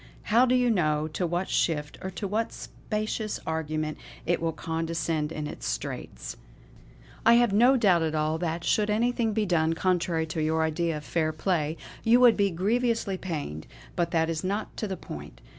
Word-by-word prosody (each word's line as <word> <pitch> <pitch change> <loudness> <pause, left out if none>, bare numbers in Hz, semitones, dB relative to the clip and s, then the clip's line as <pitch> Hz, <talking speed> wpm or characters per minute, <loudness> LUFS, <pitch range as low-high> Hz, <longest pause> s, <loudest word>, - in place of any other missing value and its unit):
How 245 +3 +6
do 250 - +3
you 250 -1 +3
know 155 -6 +1
to 175 +3 -2
what 175 +3 -1
shift, 150 -3 0
or 190 - -4
to 195 +2 -4
what 220 +3 -1
specious 215 0 -4
argument 155 -1 -2 0.3
it 175 0 +1
will 165 0 0
condescend 165 -1 -2
in 150 -2 -4
its 150 - -6
straits. - - -5 0.9
I 230 - +7
have 240 -3 +4
no 245 +6 +6
doubt 175 -8 +3 0.3
that, 170 0 -2
should 210 -1 +2
anything 230 +1 +1
be 215 0 +1
done 165 -3 +2
contrary 170 -2 +1
to 160 0 -3
your 160 +1 +1
idea 160 0 0
of 150 - -8
fair 160 0 0
play, 160 -1 -1 0.3
you 235 +2 +5
would 245 -2 +7
be 200 -1 +2
grievously 210 +2 0
pained; 145 - -5 0.3
but 170 -1 +1
that 160 -1 +2
is 160 -1 -2
not 200 +3 -2
to 215 - -2
the 190 -2 -4
point. 75 - -9
170 Hz, 175 wpm, -27 LUFS, 160-215 Hz, 0.9 s, I